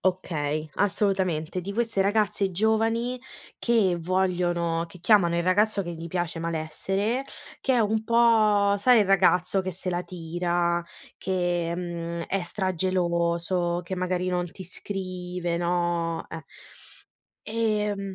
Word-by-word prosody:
Okay, 155 -5 -1
assolutamente. 185 -5 0
Di 195 +3 -5
queste 230 -2 0
ragazze 200 -1 +1
giovani 225 +5 +1 0.4
che 215 -7 +2
vogliono 175 -2 0
che 180 - -14
chiamano 175 -2 +4
il 170 - +1
ragazzo 200 +3 +2
che 175 -2 -5
gli 165 0 -7
piace: 175 -1 -2
"malessere", 180 - -2 0.4
che 265 - +1
è 245 - +3
un 220 +1 +1
po', 220 -3 +4
sai, 245 +2 +5
il 205 - +2
ragazzo 185 -1 +3
che 185 0 -3
se 185 +1 -4
la 175 0 -1
tira 175 0 -1 0.4
che, 175 -2 -1
mhmm, 170 -1 -4
è 195 0 -1
stra-geloso, 175 -1 0
che 185 +2 -4
magari 185 0 -1
non 180 -1 0
ti 190 - -9
scrive, 180 -2 -4
no, 170 -1 -1
eh. - - -7 1.0
Ehm 210 -3 -1
180 Hz, 130 wpm, -26 LUFS, 170-200 Hz, 1.0 s, sai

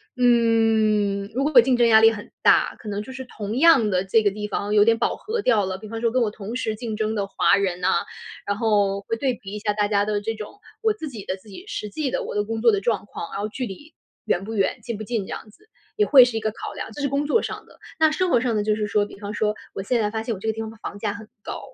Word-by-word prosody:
嗯， 225 -4 +2
如 265 +4 0
果 300 - +1
我 245 - +11
竞 255 +1 +2
争 240 -1 +4
压 220 -1 +7
力 225 0 +7
很 205 -2 -8
大， - - +4
可 220 - -12
能 205 0 -3
就 240 +5 -9
是 260 0 -7
同 215 -2 -5
样 275 -7 +6
的 185 -2 +1
这 220 +3 +3
个 205 - +3
地 210 +1 -5
方， 205 0 -2
有 205 -1 +6
点 230 0 +4
饱 - - 0
和 445 +1 -3
掉 225 - +3
了。 185 0 -3
比 215 - -10
方 225 +1 -5
说 230 -1 +1
跟 255 - +1
我 225 - +2
同 215 +3 -7
时 220 -4 -2
竞 225 -1 -5
争 215 0 -1
的 200 -2 -1
华 200 - +3
人 185 -3 -1
呐， - - +1 0.6
然 200 0 -1
后 205 -3 +1
会 225 +3 -3
对 260 +1 0
比 200 -4 -10
一 210 - -4
下 210 0 -1
大 205 -1 +1
家 205 -1 +2
的 210 -1 -1
这 225 +2 -2
种， 215 - -9 0.2
我 440 -1 +2
自 315 -8 -7
己 220 -7 -9
的 185 - -2
自 195 +2 -18
己 280 - -11
实 210 - -5
际 280 +6 -2
的 - - -1
我 - - -6
的 205 - +1
工 225 +1 -3
作 235 - +6
的 200 - +1
状 220 0 -1
况。 170 - -7
然 200 - -4
后 210 - -2
距 255 +3 -4
离， 245 - -10 0.3
远 180 - 0
不 225 - -6
远， 200 -3 0
近 235 -3 -4
不 215 - -6
近 220 -2 -2
这 - - -13
样 215 - -7
子， 425 - -23 0.3
也 420 - +4
会 265 -3 +8
是 240 -2 0
一 - - 0
个 215 0 -1
考 - - -7
量， - - -6
这 290 - -7
是 280 - 0
工 280 +2 0
作 375 +10 +2
上 - - -6
的。 - - -21 0.2
那 315 -1 +5
生 365 +3 0
活 245 - +4
上 235 -2 0
的 210 - +1
就 215 0 +1
是 215 - -1
说， 205 0 +1
比 200 - -13
方 205 0 -6
说， 210 0 0 0.2
我 195 - -4
现 235 +4 +1
在 210 - +1
发 220 - -2
现 230 - -2
我 - - -10
这 225 - -6
个 220 - +1
地 225 - -5
方 220 - -5
的 225 - -13
房 205 -2 -7
价 205 -2 -2
很 210 +1 -10 0.2
高， - - -5
220 Hz, 330 characters per minute, -23 LUFS, 205-240 Hz, 0.6 s, 我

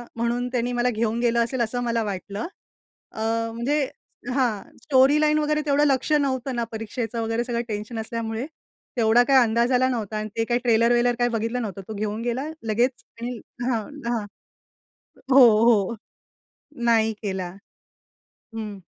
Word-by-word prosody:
म्हणून 235 +1 -1
त्यानी 245 -1 -1
मला 245 +1 +1
घेऊन 230 0 -1
गेलं 235 -1 +2
असेल 240 +1 -2
असं 245 +2 -1
मला 230 -1 0
वाटलं. 200 - -4 0.6
अ, 220 - -7 0.3
म्हणजे 260 +6 0 0.5
हां. 240 -7 -1
स्टोरी 275 +1 +5
लाईन 305 0 +3
वगैरे 300 0 +1
तेवढं 290 0 +3
लक्ष 275 +1 +1
नव्हतं 265 -3 0
ना, 235 - 0
परीक्षेचं 225 +1 -4
वगैरे 225 +1 -1
सगळं 235 -1 -2
टेन्शन 215 +1 -4
असल्यामुळे. 225 +1 -3 0.5
तेवढा 230 +1 +5
काही 270 -1 +6
अंदाज 235 +2 +1
आला 255 +1 +4
नव्हता 220 -4 -3
आणि 215 0 -3
ते 225 - +2
काही 240 +1 +1
ट्रेलर-वेलर 240 +1 +3
काही 240 0 +3
बघितलं 230 +2 -1
नव्हतं. 200 -3 -5
तो 220 - -5
घेऊन 210 +1 -3
गेला 245 +3 -2 0.3
लगेच 240 +2 +1 0.2
आणि 245 -1 -4 0.3
हां, 230 -3 +1 0.3
हां. 230 -3 -1 1.1
हो, 270 - +8 0.2
हो 230 -1 +3 0.9
नाही 225 -1 +3
केला 190 -3 -3 1.1
हं. 210 -2 -5
235 Hz, 150 wpm, -24 LUFS, 220-250 Hz, 1.1 s, हो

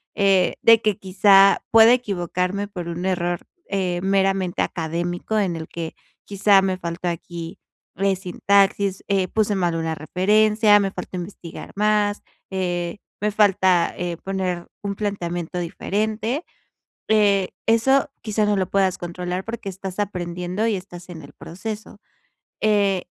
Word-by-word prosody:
eh, 195 -3 +3
de 230 -1 +6
que, 210 -3 +1
quizá, 195 +1 +5
pueda 225 +1 +8
equivocarme 195 -3 -1
por 180 -4 -7
un 170 +2 -4
error, 175 -2 0 0.3
eh, 180 -3 -1
meramente 195 -2 +1
académico 175 +5 -2
en 185 -4 0
el 160 -1 -6
que, 165 -1 -6 0.3
quizá, 200 0 +4
me 190 -1 -1
faltó 170 0 -5
aquí, 170 0 -5 0.4
eh, 195 +1 +1
sintaxis, 195 +1 +1
eh, 195 -2 +1
puse 210 +1 0
mal 175 -3 0
una 165 -1 -2
referencia, 210 +6 +3
me 195 -1 -1
falta 190 - -7
investigar 175 -2 -8
más, 210 0 +1 0.3
eh, 175 -1 -2 0.2
me 210 +1 0
falta, 190 -4 +3
eh, 175 -1 -3
poner 185 -2 -3 0.2
un 200 -1 -2
planteamiento 175 -4 -3
diferente". 215 - -2 0.7
Eh, 200 -3 +3 0.2
eso 265 +6 +3
quizás 215 -1 0
no 210 - +2
lo 190 -2 -1
puedas 190 -2 +1
controlar, 180 +1 -4
porque 225 -1 -6
estás 190 0 -7
aprendiendo 180 +1 -2
y 220 - +1
estás 180 -1 -9
en 165 -3 -9
el - - -13
proceso. 215 +5 -7 0.7
Eh, 200 -3 +2
190 Hz, 140 wpm, -22 LUFS, 175-205 Hz, 0.7 s, pueda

